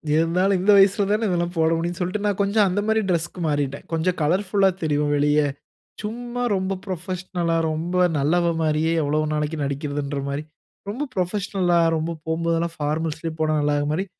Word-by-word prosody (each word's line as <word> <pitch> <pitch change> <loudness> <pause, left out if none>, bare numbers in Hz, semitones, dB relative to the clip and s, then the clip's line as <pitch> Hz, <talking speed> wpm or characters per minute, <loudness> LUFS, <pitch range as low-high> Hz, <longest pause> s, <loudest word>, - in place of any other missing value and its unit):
இருந்தாலும் 180 +4 +2
இந்த 195 +3 +4
வயசில 195 +1 +5
தான 215 +2 +1
இதெல்லாம் 175 0 -1
போட 160 0 +3
முடியும்னு 170 +2 -3
சொல்லிட்டு 185 +4 -2
நான் 200 -1 -1
கொஞ்சம் 200 0 +3
அந்த 185 +3 0
மாரி 220 0 +3
டிரெஸ்க்கு 175 +1 -1
மாறிட்டேன். 145 -2 -2
கொஞ்சம் 165 +3 0
கலர்ஃபுல்லா 190 +4 +2
தெரியும் 150 -1 +1
வெளிய 145 +1 +3 0.6
சும்மா 240 +3 -4
ரொம்ப 190 0 -1
புரொபஷனல்லா 180 -2 -2
ரொம்ப 165 +3 -3 0.2
நல்லவன் 170 +3 +1
மாரியே 155 +1 +1
எவ்வளவு 155 +1 0
நாளைக்கு 150 +1 -1
நடிக்கிறதுங்கிற 140 0 -3
மாரி 140 +2 -3 0.5
ரொம்ப 250 +8 -3
புரொபஷனல்லா 185 -1 0 0.2
ரொம்ப 160 +2 -2
போம்போதெல்லாம் 165 +1 -1
பார்மல்ஸ்லே 160 +2 -2
போனா 155 0 +1
நல்லாக்கிற 145 0 +1
மாரி 180 +6 -1
170 Hz, 150 wpm, -23 LUFS, 155-190 Hz, 0.6 s, வயசில